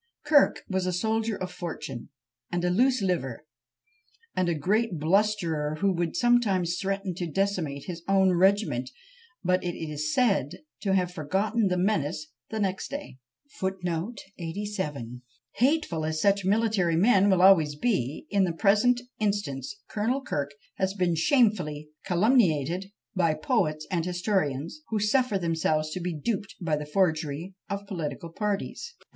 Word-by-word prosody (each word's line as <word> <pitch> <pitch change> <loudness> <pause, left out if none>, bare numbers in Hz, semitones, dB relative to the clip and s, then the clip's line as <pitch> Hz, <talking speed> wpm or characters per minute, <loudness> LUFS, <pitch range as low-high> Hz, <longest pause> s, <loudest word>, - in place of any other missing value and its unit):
Kirk 295 -1 +4
was 190 -1 -1
a 180 - 0
soldier 220 +3 0
of 185 -1 -4
fortune, 155 -8 -6 0.4
and 175 0 -1
a 180 - +2
loose 250 +3 +3
liver, 150 -8 -2 0.9
and 185 -1 +1
a 170 - +1
great 205 +5 +1
blusterer, 165 -3 +1
who 195 +5 +1
would 170 -2 -2
sometimes 200 -8 +2
threaten 195 -1 -2
to 175 0 -4
decimate 175 -7 -1
his 175 -2 -6
own 190 -1 +4
regiment, 185 - +2 0.5
but 185 0 +2
is 155 -3 -3
said 200 - +1 0.2
to 195 -2 +1
have 180 -2 0
forgotten 195 +7 0
the 180 -1 0
menace 155 -5 0 0.2
the 220 - -3
next 190 -2 -1
day. 280 - -7 2.4
Hateful 255 - +2
as 155 0 -1
such 200 +1 +2
military 205 -4 +2
men 200 +2 +5
will 185 -2 +4
always 160 -6 +6
be, 150 - -1
in 200 -1 +3
the 175 -3 0
present 215 +7 +3 0.2
instance 200 -9 -2
Colonel 240 +6 -1
Kirk 145 - -3 0.2
has 190 0 0
been 180 -3 +1
shamefully 165 - +2 0.2
calumniated 185 - +2 0.2
by 165 -4 +2
poets 155 - 0
and 170 -3 +1
historians, 180 - -1
who 220 - 0
suffer 215 +1 +2
themselves 160 -3 0
to 185 - -3
be 175 -1 -3
duped 205 +4 -3
by 165 -5 0
the 150 0 -5
forgeries 160 -1 0 0.2
of 200 0 -4
political 170 -4 -5
parties! 210 - -3
185 Hz, 140 wpm, -27 LUFS, 160-205 Hz, 2.4 s, always